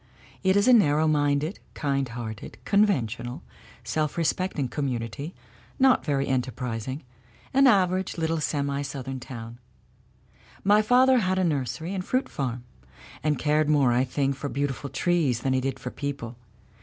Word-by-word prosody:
It 190 0 +3
is 200 +3 +3
a 255 - +7
narrow 155 -8 +4
minded, 145 +3 +1 0.2
kind 140 -3 -1
hearted, 115 -2 -7
conventional, 125 - +1 0.4
self 155 -1 -1
respecting 165 -3 0
community, 130 - -4 0.4
not 260 -1 +4
very 140 -2 0
enterprising 130 0 -3 0.5
an 275 +1 +6
aver 185 -5 +4
age 190 - -5
little 160 -1 0
semi 140 -2 -1
Southern 135 -1 -5
town. 120 -2 -9 1.0
My 205 +2 +5
father 255 +3 +5
had 185 -3 0
a 190 - +2
nursery 160 +2 -1
and 190 -2 -2
fruit 255 +7 -1
farm, 125 -3 -3 0.6
and 150 +1 +1
cared 150 +2 +2
more, 140 -5 +4
I 125 +2 +3
think, 135 +1 -1
for 140 +2 -5
beautiful 140 0 -2
trees 155 -10 +1
than 135 - 0
he 130 - +1
did 135 0 -2
for 125 0 -6
people. 140 -5 -5
145 Hz, 150 wpm, -26 LUFS, 130-175 Hz, 1.0 s, a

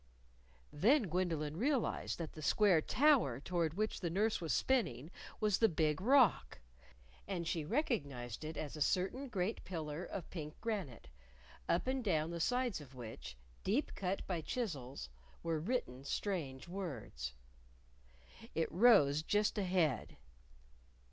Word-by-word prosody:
Then 230 - +4
Gwendolyn 160 -3 -1
realized 265 +3 0
that 165 -3 -5
the 155 - -9
square 185 +1 +4
tower 250 - +3
toward 165 0 -1
which 215 +2 -1
the 175 - -2
nurse 210 +4 +1
was 165 - -2
spinning 165 - +1 0.3
was 210 -3 +2
the 225 - +5
Big 155 -1 +1
Rock. 230 - +4 0.7
And 175 -4 -3
she 165 -2 -1
recognized 145 - -2
it 155 0 -5
as 150 -1 -4
a 150 - -7
certain 190 - +1
great 200 -2 -2
pillar 160 -2 -4
of 185 -2 -6
pink 155 -3 -6
granite, 195 - -4 0.6
up 170 - +2
and 260 0 -1
down 165 -5 +1
the 170 - -4
sides 245 -1 0
of 135 -2 -13
which, 110 - -8 0.3
deep 235 +10 0
cut 190 0 -2
by 175 -4 -2
chisels, 145 - -4 0.4
were 165 -2 0
written 155 - -2
strange 145 -4 -3
words. 130 - -5 1.2
It 165 - 0
rose 155 -8 +6
just 210 +6 +1
ahead. 180 - 0
170 Hz, 135 wpm, -36 LUFS, 150-215 Hz, 1.2 s, rose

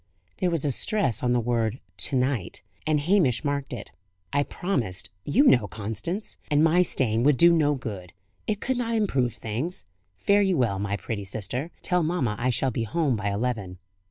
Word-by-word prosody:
There 180 - +2
was 165 -4 0
a 145 - +2
stress 200 - +1
on 125 - +1
the 125 - +3
word 115 0 0 0.2
"to 140 - 0
night," 125 -7 -1 0.2
and 155 -1 +3
Hamish 160 - +2
marked 140 -1 -2
it. 120 -5 -7 0.4
"I 145 - +3
promised, 125 - -3
you 235 - +4
know, 120 - +5
Constance. 110 - -4
And 150 0 +4
my 165 +2 +5
staying 120 -10 +1
away 120 - +1
would 145 -2 +5
do 170 +4 +7
no 150 -2 +3
good; 100 -9 -6 0.4
it 210 -2 0
could 260 +2 -1
not 230 -1 -1
improve 135 - +1
things. 130 - -3 0.3
Fare 200 - +3
you 190 -4 +2
well, 115 -6 +1
my 100 0 -1
pretty 105 +1 -4
sister. 110 - -3
Tell 180 -1 +2
mamma 155 -10 0
I 125 +1 +1
shall 130 +1 +1
be 115 - -2
home 135 +4 0
by 105 -1 -2
eleven." 100 -3 -2
130 Hz, 190 wpm, -26 LUFS, 110-170 Hz, 0.4 s, do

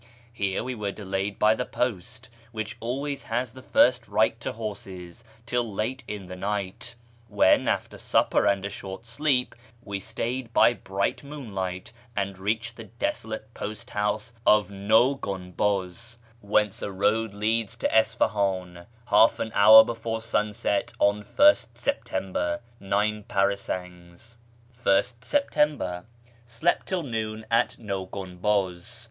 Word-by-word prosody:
Here 100 -4 -1
we 130 - -3
were 105 -4 -3
delayed 100 0 -3
by 105 +1 +5
the 125 - -2
post, 120 -1 -3 0.2
which 110 -1 -4
always 135 +4 -3
has 120 0 -2
the 130 - -11
first 125 -1 +3
right 110 +1 +2
to - - -4
horses, 100 -3 -7 0.2
till 120 -1 -1
late 120 +6 -3
in 105 -2 -6
the 90 - -8
night, 100 +4 -4 0.3
when, 105 -3 +4
after - - -1
supper - - +2
and 100 -1 +1
a - - -2
short 95 +3 -8
sleep, 125 +2 +1 0.3
we 100 -1 -4
started 115 +4 -4
by 120 - +6
bright 100 0 -2
moonlight, 100 -10 -5 0.2
and 100 -1 -2
reached 110 +4 -2
the 115 - -8
desolate 110 0 -4
post 105 +1 -7
house 105 +2 -1
of 105 -4 +4
Naw 110 +7 +3
Gunbuz 100 +3 -3 0.2
(whence 105 -1 +1
a 100 - -3
road 105 +2 +1
leads 110 +1 0
to 115 - 0
Isfahan) 100 -6 +1 0.2
half 110 +2 +6
an 110 - -3
hour 110 +2 +9
before 115 -1 -4
sunrise 105 -2 0
on 100 +1 +2
1st 285 - +4
September 95 -7 -2 0.2
(nine 105 +2 0
parasangs). 95 +1 -3 0.5
\st 115 +5 +2
Se/ptmibcr. 150 - 0 0.2
— 120 0 -29
Slept 120 +9 0
till 185 -3 -1
noon 110 -4 -4
at 115 +1 +2
Naw 100 -4 -4
Gunbuz. 95 +2 -2
105 Hz, 135 wpm, -26 LUFS, 100-115 Hz, 0.5 s, hour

